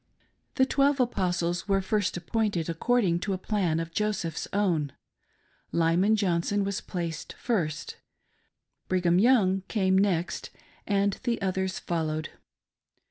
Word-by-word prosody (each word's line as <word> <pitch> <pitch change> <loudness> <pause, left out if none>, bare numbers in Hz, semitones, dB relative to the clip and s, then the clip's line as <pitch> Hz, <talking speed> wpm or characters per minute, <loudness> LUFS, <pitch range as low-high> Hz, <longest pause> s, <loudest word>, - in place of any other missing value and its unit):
The 260 - +4
"Twelve 275 +1 +2
Apostles" 180 -7 0
were 195 -1 +3
first 200 0 0
ap 175 - -8
pointed 210 -7 0
according 180 0 +1
to 195 +2 -2
a - - -1
plan 185 -5 0
of 165 0 -4
Joseph's 185 -5 -2
own 170 -9 0 0.4
— - - -40
Lyman 170 +6 +3
Johnson 200 0 +1
was 200 0 -2
placed 170 -3 -5
first, 170 -11 -2 0.9
Brigham 180 -1 +2
Young 200 -5 +4
came 190 -4 +1
next, 180 -3 0 0.4
and 200 -1 +1
the 235 -1 -1
others 190 -1 -1
followed. 155 -2 -2
190 Hz, 130 wpm, -27 LUFS, 170-210 Hz, 0.9 s, The